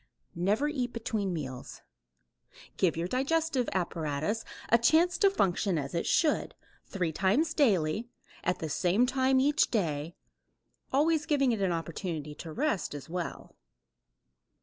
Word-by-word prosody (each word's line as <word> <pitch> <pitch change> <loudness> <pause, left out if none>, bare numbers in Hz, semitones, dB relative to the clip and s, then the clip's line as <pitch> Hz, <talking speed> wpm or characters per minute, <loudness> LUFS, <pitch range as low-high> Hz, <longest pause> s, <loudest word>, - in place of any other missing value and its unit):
Never 205 +11 +1
eat 255 -5 -2
between 220 -4 -2
meals. 130 -7 -6 0.9
Give 175 -4 +2
your 170 +1 -1
digestive 270 - 0
apparatus 165 +3 -2 0.3
a 235 - +5
chance 330 +8 +4
to 400 - +6
function 195 - +1
as 140 -2 -4
it 170 - -1
should, 315 -2 +1 0.3
three 180 -5 -2
times 220 - +1
daily, 210 - +2 0.3
at 180 - 0
the 160 - -4
same 180 - +2
time 260 0 +2
each 290 +3 +3
day, 165 -6 -1 0.8
always 305 +2 +2
giving 275 -4 +3
it 220 -3 -1
an 190 -2 +2
opportunity 165 -2 -4
to 160 +2 -8
rest 225 - -1
as 145 +2 -8
well. 175 -1 -5
200 Hz, 135 wpm, -30 LUFS, 165-270 Hz, 0.9 s, to